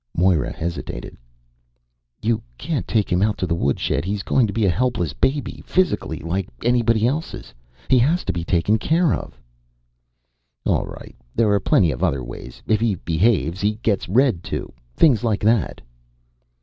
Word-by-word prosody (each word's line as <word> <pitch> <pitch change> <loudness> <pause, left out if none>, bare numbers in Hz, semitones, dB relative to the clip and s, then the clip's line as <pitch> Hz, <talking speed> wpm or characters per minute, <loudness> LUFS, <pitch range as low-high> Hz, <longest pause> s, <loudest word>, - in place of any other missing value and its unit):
Moira 90 -3 +2
hesitated. 85 -7 -5 1.1
"You 110 0 +1 0.2
can't 155 -3 -3
take 110 -3 0
him 90 +1 +2
out 105 0 +1
to - - -1
the 85 - -1
woodshed. 70 -2 0
He's 100 +2 -3
going 125 -4 +2
to - - -3
be 110 0 0
a - - +4
helpless 120 - 0
baby, 140 +1 -1
physically, 180 - 0
like 90 +5 -3
anybody 115 -2 +2
else's. 150 +7 -3 0.3
He 130 - +5
has 160 +9 +2
to - - -1
be 85 - -3
taken 90 +6 +1
care 160 +4 +2
of." - - -6 1.3
"All - - +1
right, - - -10 0.2
there 110 -3 +3
are 100 - +3
plenty 90 -3 +3
of 65 - -4
other 70 -2 +1
ways. - - -9
If 110 -1 +2
he 115 -3 +1
behaves, 85 +1 +1
he 105 +1 +2
gets 100 -6 0
read 115 -4 +3
to. - - -4 0.2
Things 130 -10 +4
like 110 -3 0
that." 110 -2 +1
105 Hz, 165 wpm, -22 LUFS, 85-120 Hz, 1.3 s, He